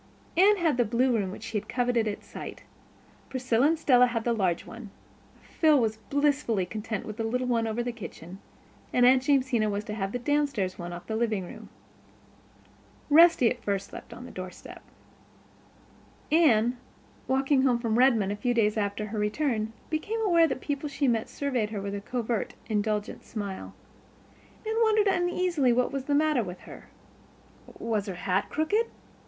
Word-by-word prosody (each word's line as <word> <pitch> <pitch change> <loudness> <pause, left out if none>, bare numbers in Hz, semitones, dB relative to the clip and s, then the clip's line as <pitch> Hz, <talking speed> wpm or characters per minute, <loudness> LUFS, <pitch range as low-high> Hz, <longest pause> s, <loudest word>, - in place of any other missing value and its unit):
Anne 400 +4 +5
had 325 -8 +1
the 245 - +4
blue 240 +3 +1
room 195 -3 -2
she 220 -1 -3
had - - -16
coveted 245 -3 +1
at 205 - -4
sight. - - -9 0.7
Priscilla 255 0 +2
and 325 +1 +2
Stella 250 -5 +5
had 230 -2 -2
the 235 - +1
large 185 -6 0
one. 225 -2 -10 0.5
Phil 310 -3 +3
was 220 -2 0
blissfully 280 -5 0
content 215 +1 -5
with 215 0 -7
the 225 - -2
little 250 +3 -1
one 230 -2 +1
over 225 +2 -2
the 245 - -2
kitchen; 190 -5 -10 0.5
and 245 - +4
Aunt 255 +1 +6
Jamesina 255 -5 +2
was 205 0 -2
to 210 - -6
have 195 -2 -3
the 245 - -2
downstairs 270 -8 -1
one 175 0 -5
off 175 0 -8
the 220 - -3
living 220 -4 0
room. - - -11 1.4
Rusty 325 -6 +6
at 245 - -5
first 200 -1 -2
slept - - -10
on 250 - -9
the - - -10
doorstep. 185 0 -9 1.5
Anne, 250 -7 +4 0.5
walking 270 +1 +2
home 255 -3 +3
from 230 -1 0
Redmond 230 -7 +4
a - - -2
few 245 +4 -1
days 215 -2 +2
after 205 0 -1
her 215 0 -4
return, 220 0 -1 0.2
became 415 +9 -2
aware 340 -6 +4
that - - -2
the - - -17
people 290 0 -2
that 280 - -11
she 280 - +1
met 230 -3 0
surveyed 255 -7 -1
her 210 -2 -4
with 200 0 -4
a 200 - -4
covert, 235 0 -3
indulgent 210 -1 -2
smile. 200 -4 -6 0.9
Anne 445 +1 0
wondered 435 -2 +4
uneasily 355 -7 +1
what 250 +1 +1
was 275 -1 -4
the 285 - +1
matter 300 -3 +3
with 180 -4 -7
her. - - -12 0.9
Was 220 -3 -2
her 190 - -4
hat 195 +2 -1
crooked? 410 +10 +1
240 Hz, 180 wpm, -27 LUFS, 210-280 Hz, 1.5 s, Aunt